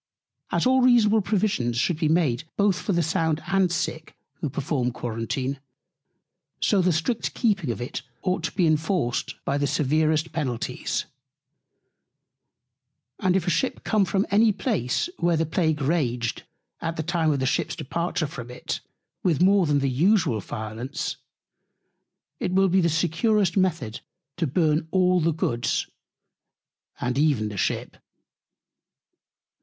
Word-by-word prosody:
As - - +1
all 260 +1 +4
reasonable 225 -4 +5
Provisions 190 - 0
should 155 +6 +1
be 155 - +1
made 155 -4 +1
both 200 -3 +2
for - - -2
the 170 -2 +2
Sound 160 0 0
and 190 -2 +2
Sick, 160 -2 -3 0.2
who 150 - -2
perform 130 -3 -1
Quarentine; 125 +3 -3 1.0
so 200 -3 +3
the 180 0 +3
strict 175 +9 -1
keeping 200 - +1
of 115 - -2
it 120 - -4 0.2
ought 185 -1 0
to - - -2
be 185 -3 +2
inforced 155 -4 0
by 140 +1 0
the 145 - +1
severest 155 +3 +1
Penalties. 130 -8 -2 2.1
And 185 -1 +2
if 190 -3 +1
a 180 - +1
Ship 260 - -1
come 215 -2 +2
from 195 +1 +1
any 215 +2 +5
Place, 200 - -1
where 170 -1 +2
the 160 - +1
Plague 160 -1 0
raged, 125 -7 -1 0.4
at 165 0 -2
the 160 - -2
Time 165 -1 +1
of 140 - 0
the 130 - 0
Ship's 130 - 0
Departure 170 +3 -2
from 125 -4 -7
it, 125 - -5 0.4
with 165 -6 +1
more 195 -2 +4
than 145 -1 +3
usual 150 - +2
Violence, 110 +5 -5 1.2
it - - -1
will 190 +1 +3
be 190 +1 +3
the 170 - +2
securest 175 +4 +1
Method 165 - 0 0.4
to 170 -2 0
Burn 155 +2 +1
all 185 0 +3
the 165 +1 +2
Goods, 120 -7 -1 1.1
and 125 +2 -1
even 140 -9 +2
the 105 - -7
Ship. - - -2
160 Hz, 145 wpm, -25 LUFS, 135-185 Hz, 2.1 s, reasonable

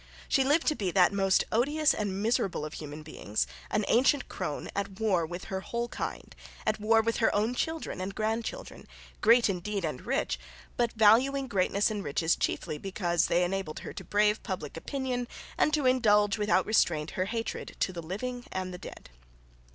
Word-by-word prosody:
She 270 - +3
lived 295 +5 +3
to 305 - +2
be 195 -7 -1
that 180 +2 +4
most 195 -1 +3
odious 295 +7 +3
and 200 -1 -2
miserable 205 -8 0
of 155 - -7
human 150 0 -7
beings, 110 -8 -2 0.2
an 210 -1 0
ancient 270 +4 +3
crone - - -4
at 200 0 -3
war 190 -7 +2
with 175 +2 -6
her 190 -1 -4
whole 235 +4 -3
kind, - - -5 0.3
at 215 0 0
war 225 +1 +4
with 230 0 0
her 225 - +2
own 215 +4 +1
children 320 - -3
and 195 +1 -4
grandchildren, 225 - -3 0.3
great 230 +2 +6
indeed 195 0 -2
and 150 -5 -4
rich, 270 +2 0 0.4
but 235 -1 +1
valuing 250 +6 +4
greatness 200 0 +1
and 205 -2 -3
riches 160 +3 +1
chiefly 150 - -2
because 180 -2 0
they 175 - +2
enabled 185 -3 -3
her - - -7
to - - -7
brave 210 +1 +2
public 185 -8 -5
opinion 250 +6 -3 0.3
and 305 - +2
to 295 -3 -1
indulge 210 -5 +4
without 210 -1 +2
restraint 165 -7 +2
her 185 - -1
hatred 230 +2 -4
to 185 - 0
the 170 - -5
living 245 +9 -5
and 185 -1 -3
the 180 - -7
dead. - - -11
210 Hz, 180 wpm, -29 LUFS, 185-235 Hz, 0.4 s, great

